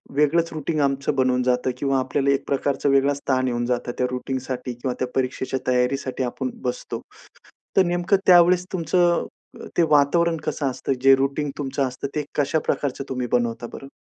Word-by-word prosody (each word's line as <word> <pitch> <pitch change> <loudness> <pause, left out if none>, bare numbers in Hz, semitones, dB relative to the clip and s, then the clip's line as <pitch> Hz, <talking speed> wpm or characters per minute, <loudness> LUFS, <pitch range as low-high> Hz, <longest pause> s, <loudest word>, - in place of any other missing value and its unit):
वेगळंच 165 +3 +2
रूटीन 155 0 -2
आमचं 140 0 0
बनवून 130 -1 +2
जातं 125 0 +1
किंवा 135 0 +1
आपल्याला 140 +1 0
1 135 - -1
प्रकारचा 140 0 0
वेगळाच 140 +1 +3
ताण 130 0 +2
येऊन 120 -1 -1
जातं 120 0 -1
त्या 125 - +1
रूटीनसाठी 125 -1 -4
किंवा 125 +1 -3
त्या 130 - 0
परीक्षेच्या 130 0 -1
तयारीसाठी 130 +1 0
आपण 125 - -3
बसतो. - - -4 0.8
तर 190 - +7
नेमकं 175 +3 +2
त्यावेळेस 180 0 +6
तुमचं 175 0 +2 0.4
अ, - - -8
ते 170 - +5
वातावरण 165 +3 +3
कसं 140 -3 -1
असतं? 135 - -2
जे 135 0 +7
रूटीन 140 +2 -1
तुमचं 135 -1 -1
असतं 130 +2 -5
ते 150 - 0
कशा 145 +2 +1
प्रकारचं 135 -1 -1
तुम्ही 125 -2 -2
बनवता 120 -1 0
बरं? 135 - -8
135 Hz, 170 wpm, -23 LUFS, 130-150 Hz, 0.8 s, तर